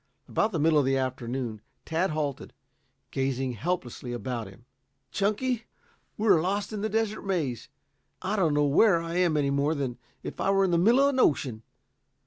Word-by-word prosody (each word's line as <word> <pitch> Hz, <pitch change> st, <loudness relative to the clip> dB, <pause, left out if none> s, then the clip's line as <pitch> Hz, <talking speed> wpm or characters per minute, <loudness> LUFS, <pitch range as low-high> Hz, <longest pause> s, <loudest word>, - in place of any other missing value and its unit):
About 215 Hz, -, +1 dB
the 175 Hz, -, -1 dB
middle 155 Hz, 0 st, +4 dB
of 140 Hz, -, +2 dB
the 135 Hz, 0 st, +2 dB
afternoon 125 Hz, -3 st, -3 dB, 0.2 s
Tad 170 Hz, +4 st, 0 dB
halted, 150 Hz, -4 st, -3 dB, 0.6 s
gazing 135 Hz, -1 st, -1 dB
helplessly 125 Hz, -, -3 dB
about 120 Hz, -2 st, -4 dB
him. 100 Hz, +5 st, -15 dB, 0.5 s
"Chunky, 225 Hz, +4 st, 0 dB, 0.5 s
we're 200 Hz, -6 st, +4 dB
lost 200 Hz, +5 st, -1 dB
in 210 Hz, -, -3 dB
the 215 Hz, -, -1 dB
Desert 220 Hz, 0 st, -1 dB
Maze. 155 Hz, -, -2 dB, 0.5 s
I 195 Hz, +3 st, -2 dB
don't 165 Hz, -7 st, +2 dB
know 145 Hz, 0 st, +3 dB
where 170 Hz, +6 st, +5 dB
I 165 Hz, +1 st, -4 dB
am 175 Hz, -4 st, +3 dB
any 140 Hz, -1 st, +1 dB
more 140 Hz, +3 st, +1 dB
than 130 Hz, -4 st, -3 dB, 0.2 s
if -, -, -6 dB
I -, -, +1 dB
were 195 Hz, 0 st, +4 dB
in 185 Hz, -, 0 dB
the 170 Hz, -, +3 dB
middle 230 Hz, +9 st, +5 dB
of 280 Hz, -, +5 dB
an 265 Hz, -2 st, -1 dB
ocean. 130 Hz, -, +2 dB
155 Hz, 180 wpm, -27 LUFS, 130-195 Hz, 0.6 s, where